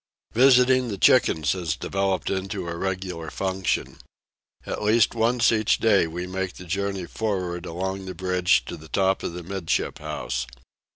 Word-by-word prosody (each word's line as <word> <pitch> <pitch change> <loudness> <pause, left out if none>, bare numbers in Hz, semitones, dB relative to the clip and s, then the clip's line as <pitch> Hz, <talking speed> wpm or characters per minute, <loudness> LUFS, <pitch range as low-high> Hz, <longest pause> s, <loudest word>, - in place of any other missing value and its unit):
Visiting 130 +1 +5
the 100 -4 -4
chickens 80 -4 +4
has 85 -4 -1
developed 95 +1 -1
into 95 -1 -3
a 85 - -4
regular 90 -3 -4
function. 95 -1 -2 0.7
At - - -4
least 110 +2 +3
once 120 +1 +3
each 110 -2 +2
day 100 -6 +3
we 85 +2 -5
make 95 0 -3
the 90 - -11
journey 100 +1 -2
for'ard 90 -4 -3
along 95 +3 -4
the 95 - -6
bridge 90 -7 +2
to - - -7
the 80 0 -14
top 95 -1 +1
of - - -4
the 90 0 -7
'midship 95 -1 -2
house. 60 0 -4
95 Hz, 160 wpm, -24 LUFS, 90-100 Hz, 0.7 s, Visiting